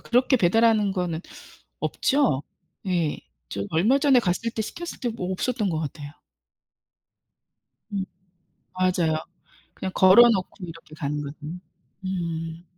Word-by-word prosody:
그렇게 255 +2 +3
배달하는 220 0 +3
거는 175 -3 -2 0.6
없죠? 265 - +1 0.4
예. 170 -5 0 0.3
저 100 - -4
얼마 215 +13 +3
전에 275 -3 +5
갔을 195 +2 0
때 220 - -2
시켰을 340 +10 -6
때 245 - -1
뭐 190 -5 -4
없었던 215 +1 -1
것 160 -2 -1
같아요. 145 -1 -6 1.8
음 195 -1 -1 0.7
맞아요. 180 -3 +2 0.6
그냥 190 -1 -4
걸어놓고 195 0 +5
이렇게 165 -2 -11
가는 150 -1 -2
거거든요. 150 +4 -7 0.5
음. 165 -2 -4
185 Hz, 245 characters per minute, -25 LUFS, 165-225 Hz, 1.8 s, 전에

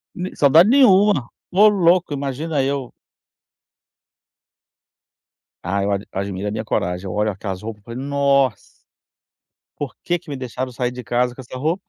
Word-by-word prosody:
Ne 185 +1 -5
saudade 155 +7 +6
nenhuma. 205 - +5 0.2
Ô, 205 +4 +6
louco, 180 -5 +3
imagina 140 +2 -2
eu. 135 -2 -2 2.7
Ah, 100 +2 -1
eu 100 - 0
ad 100 +1 -2
admiro 100 0 -4
a - - -2
minha 110 +1 -3
coragem. 90 -2 -2
Eu - - -5
olho 105 +1 +1
aquelas 95 -1 -6
roupas, 105 -1 -8
falei: 120 +3 -7
"Nossa" 140 -3 +2 1.2
"por 145 -4 -5
que 175 - 0
que - - -16
me 145 - -4
deixaram 130 0 -5
sair 125 0 -2
de 125 0 -8
casa 120 +2 0
com 130 - -9
essa 130 0 -9
roupa?". 160 +8 -1
130 Hz, 155 wpm, -20 LUFS, 105-160 Hz, 2.7 s, saudade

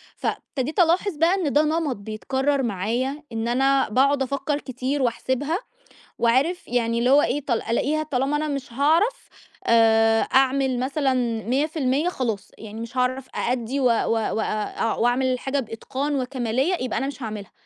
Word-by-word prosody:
فابتديت 285 +7 -3
ألاحظ 355 +1 +3
بقى 330 +4 +3
إن 340 -8 -1
ده 295 - +4
نَمَط 310 -3 0
بيتكرَّر 265 +7 -1
معايا 240 +7 -2
إن 225 0 -2
أنا 270 +2 +2
باقعُد 270 +4 +3
أفكّر 280 +2 -2
كتير 260 +2 -3
وأحسبها 260 +5 0 0.6
وعارف 270 +10 +1
يعني 235 -1 0
اللي 245 +2 +2
هو 285 +2 +6
إيه، 290 +1 -1
طال 240 -5 0
ألاقيها 295 +7 0
طالما 280 0 0
أنا 310 - -2
مش 275 -4 -4
هاعرف 330 - +1 0.4
آآ 225 -1 +5
أعمل 265 -1 +2
مثلًا 270 +1 0 0.3
100% 285 +4 0
خلاص، 230 - -3
يعني 220 +1 -8
مش 235 +3 -7
هاعرف 255 +1 0
أأدّي 245 +2 -1
و 265 - +1
و - - +7 0.3
وأ 225 0 -1 0.4
أع 225 - +1
وأعمل 245 +2 +2
الحاجة 260 +2 -1
بإتقان 270 +5 -3
وكَمالية 255 +5 0
يبقى 255 - -2
أنا 270 - -1
مش 275 -1 -7
هاعملها. 210 -3 -6
265 Hz, 155 wpm, -23 LUFS, 235-290 Hz, 0.6 s, و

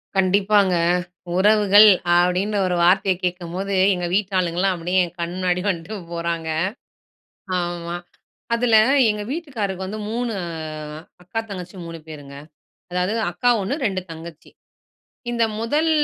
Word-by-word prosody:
கண்டிப்பாங்க, 195 0 +3 0.6
உறவுகள் 205 +1 +6 0.3
அப்படின்னு 180 +4 +1
ஒரு 180 - 0
வார்த்தைய 190 +2 +4
கேட்கும்போது, 180 +2 -3 0.2
எங்க 180 -1 -3
வீட்டாளுங்கலாம் 185 -2 +1
அப்படியே 180 +2 0
என் 175 - -12
கண் 170 0 -3
முன்னாடி 180 -1 0
வண்ட்டு 185 +3 -3 0.2
போறாங்க. 170 -1 -3 1.1
ஆமா. 175 0 -4 0.6
அதுல 235 -1 +3 0.3
எங்க 210 0 -3
வீட்டுக்காரருக்கு 215 - -4
வந்து 215 +3 -5
3 235 0 -2 0.9
அக்கா, 195 +6 -3
தங்கச்சி 180 -1 -7
3 165 0 -7
பேருங்க. 145 -3 -10 0.6
அதாவது 180 +3 0 0.2
அக்கா 245 +8 +1
1. 195 +9 -2
2 190 -3 -1
தங்கச்சி. 165 -1 -10 0.8
இந்த 235 -1 +1 0.2
முதல் 300 +8 +1
185 Hz, 115 wpm, -22 LUFS, 175-210 Hz, 1.1 s, உறவுகள்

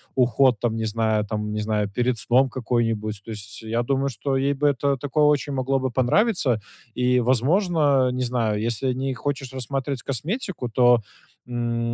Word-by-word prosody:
уход 125 -1 +3
там 115 0 -1
не 110 0 -2
знаю 110 -1 0
там 105 0 -3
не 105 - -2
знаю 105 -1 0
перед 120 +4 0
сном 130 +5 +3
какой-нибудь. 115 -4 -1
То 115 - -7
есть 105 -2 -7
я 115 +2 -1
думаю, 135 +2 0
что 135 +3 -2
ей 135 +1 +1
бы 145 +1 +1
это 140 0 +1
такое 145 +3 0
очень 145 -1 +2
могло 135 0 0
бы 130 -1 -2
понравиться. 130 - +2 0.3
И, 125 +1 +2
возможно, 140 - +2
не 125 0 -2
знаю, 115 -4 0
если 120 +3 -1
не 135 +1 -2
хочешь 135 0 -4
рассматривать 135 +1 -3
косметику, 160 - -3
то, 120 +1 +5 0.5
м, 120 -1 -2
125 Hz, 170 wpm, -23 LUFS, 115-135 Hz, 0.5 s, то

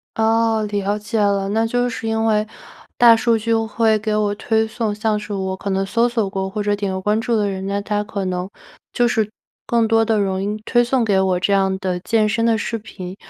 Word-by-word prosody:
哦， 225 0 +2
了 205 0 -1
解 215 +1 -3
了， 200 -1 +1
那 225 +2 +1
就 245 +1 0
是 230 -1 -5
因 225 0 0
为 215 -1 +2 0.5
大 235 -1 +7
数 230 0 +2
据 230 +1 -1
会 225 0 +2
给 215 0 -1
我 210 -1 +1
推 220 +1 0
送， 220 -1 -2
像 215 0 0
是 210 0 -7
我 190 -1 -2
可 200 - -6
能 195 0 0
搜 235 +4 +1
索 225 -5 -1
过 190 0 -3
或 210 +2 -4
者 205 0 +1
点 200 -1 -3
过 190 - -3
关 210 +3 +1
注 235 0 0
的 205 -2 +1
人， 190 0 -5
那 200 0 -1
它 210 0 -1
可 200 -2 -4
能 185 +1 -3 0.4
就 240 0 +2
是 220 -3 0 0.4
更 230 -1 +2
多 225 0 +3
地 220 -1 +1
容 190 -1 -1
易 210 +2 -2
推 240 0 +3
送 245 -1 +1
给 200 -3 +2
我 185 -2 +1
这 200 +2 +1
样 190 -1 +2
的 185 -2 -2
健 215 +3 +1
身 220 +2 0
的 225 -1 +3
视 230 +2 -3
频， 190 -4 -9
210 Hz, 255 characters per minute, -20 LUFS, 195-225 Hz, 0.5 s, 大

